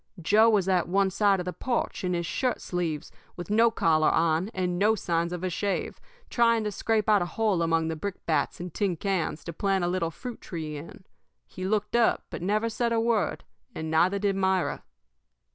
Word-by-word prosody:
Joe 210 +7 +5
was 200 -4 +2
at 185 -3 +2
one 195 +1 +2
side 200 0 +3
of 180 - -4
the 180 - -3
porch, 245 -6 -2
in 180 -1 0
his 170 0 -2
shirt 250 +7 -1
sleeves, 165 -3 -3 0.2
with 175 +3 -7
no 230 +2 +5
collar 160 -8 +2
on, 165 +3 +1
and 180 -3 -2
no 215 +2 +4
signs 170 -3 -1
of 180 0 -5
a 185 - 0
shave, 200 +3 -2 0.3
trying 230 -2 +2
to 210 - -2
scrape 220 +1 0
out 210 -3 +4
a 175 - -1
hole 210 -3 0
among 165 -1 +1
the 160 - -2
brickbats 165 -2 -2
and 175 -1 -6
tin 195 -4 0
cans 180 -4 -2
to 170 - -6
plant 195 +2 0
a - - +1
little 175 -2 0
fruit 245 +8 -8
tree 155 -3 -6
in. 155 +5 -10 0.4
He 185 - -7
looked 210 +2 -1
up 235 -1 +3
but - - -6
never 210 +5 0
said 235 +1 -1
a 230 - +2
word, 225 -2 0 0.3
and 160 0 -4
neither 175 +5 +3
did 200 -1 0
Myra. 190 -1 0
190 Hz, 205 wpm, -27 LUFS, 170-210 Hz, 0.4 s, Joe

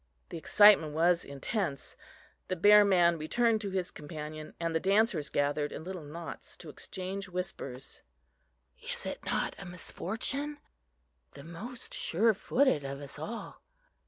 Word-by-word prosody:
The - - -5
excitement 200 -4 +6
was 170 +2 +3
intense. 140 - -3 0.5
The 185 - -1
bear 205 +4 +8
man 175 -4 +4
returned 225 +8 +2
to 205 - -2
his 185 -2 -2
companion, 155 0 -8
and 165 -1 -1
the 160 - +2
dancers 195 -5 +2
gathered 145 +1 0
in - - -6
little 185 0 -6
knots 160 +3 -8
to - - -10
exchange 190 +1 -5
whispers. 175 -8 -5 0.8
"Is - - -5
it - - -5
not - - -1
a 195 - -8
misfortune?" 225 - -3 0.8
"The 140 - -10
most 220 - -8
surefooted 220 - +2
of 140 0 -5
us 140 0 -8
all!" 220 +10 -6
175 Hz, 135 wpm, -31 LUFS, 155-205 Hz, 0.8 s, bear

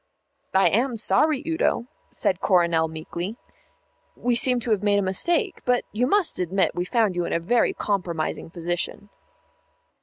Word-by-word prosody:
"I 190 - +5
am 240 +2 0
sorry, 300 +5 +2
Udo," 320 -7 0 0.2
said 190 -1 -1
Coronel 170 -4 +3
meekly; 170 +6 -6 0.8
"we 245 - 0
seem 250 +1 +3
to 230 - -3
have 210 -3 +2
made 205 -1 +2
a - - +2
mistake. 340 - 0
But 250 0 +1
you 240 +4 0
must 400 +2 +1
admit 185 +2 +1
we 175 - -2
found 215 -1 +1
you 175 - 0
in - - -3
a - - +1
very 230 +8 +1
compromising 175 -6 -2
position." 175 +4 -4
205 Hz, 155 wpm, -24 LUFS, 175-245 Hz, 0.8 s, I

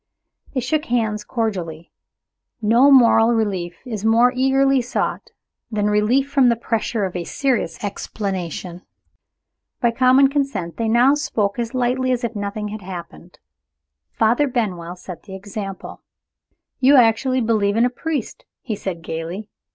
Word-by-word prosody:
They 255 - +1
shook 295 +5 -1
hands 220 -3 -1
cordially. 180 -10 -4 0.7
No 235 +5 +4
moral 235 -3 +6
relief 190 -6 -2
is 220 -5 -5
more 230 +3 +4
eagerly 270 +1 +3
sought 245 +2 -3 0.4
than 210 -2 0
relief 225 +7 +2
from 275 -3 +3
the 235 - +3
pressure 225 -2 -2
of 185 - -6
a 175 - -2
serious 235 - -2
explanation. 185 -4 -4 1.0
By 235 -2 +2
common 260 +3 +4
consent, 275 - -2
they 230 - -1
now 245 +4 +5
spoke 220 -7 -1
as 235 +1 -3
lightly 255 +1 0
as 245 -1 -1
if 235 -1 -3
nothing 205 +1 -4
had 215 0 -7
happened. 180 -1 -10 0.7
Father 235 +6 +2
Benwell 185 -9 -3
set 180 -1 -10
the 190 -2 -10
example. 195 0 -7 0.8
"You 270 +2 +5
actually 255 +1 +3
believe 215 -2 +1
in 235 - +4
a 250 - 0
priest!" 295 -1 -4 0.2
he 225 -5 -3
said 180 -4 -6
gayly. 165 +7 -5
225 Hz, 145 wpm, -21 LUFS, 200-255 Hz, 1.0 s, moral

